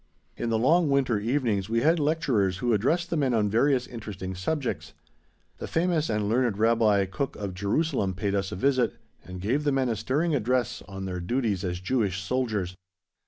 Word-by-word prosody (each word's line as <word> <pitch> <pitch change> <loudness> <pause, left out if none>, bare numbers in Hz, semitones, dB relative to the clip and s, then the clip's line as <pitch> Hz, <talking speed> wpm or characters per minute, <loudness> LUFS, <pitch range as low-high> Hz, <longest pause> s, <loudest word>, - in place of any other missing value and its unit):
In 120 - -3
the 115 - +2
long 155 +7 +3
winter 130 -6 +2
evenings 110 -4 0
we 115 +1 +1
had 160 +4 +3
lecturers 135 - +1
who 120 +4 0
addressed 160 - +1
the - - +1
men 135 -5 +1
on 105 -2 +1
various 125 +3 +3
interesting 105 -5 -6
subjects. 125 - -3 0.7
The - - -5
famous 165 -2 +1
and 105 -2 0
learned 115 -1 +1
Rabbi 110 -3 +3
Kuk 125 +9 -3
of 100 -3 -5
Jerusalem 100 - 0
paid 100 +1 -1
us 100 -1 -1
a - - -4
visit, 130 +3 +1 0.3
and 90 0 -8
gave 125 +11 0
the 145 - +2
men 135 -2 +1
a 115 - 0
stirring 140 +10 0
address 125 -2 0
on 95 -1 -6
their 90 -1 -4
duties 105 0 -1
as 90 -2 -2
Jewish 100 -2 0
soldiers. 105 -4 -2
115 Hz, 185 wpm, -27 LUFS, 100-135 Hz, 0.7 s, long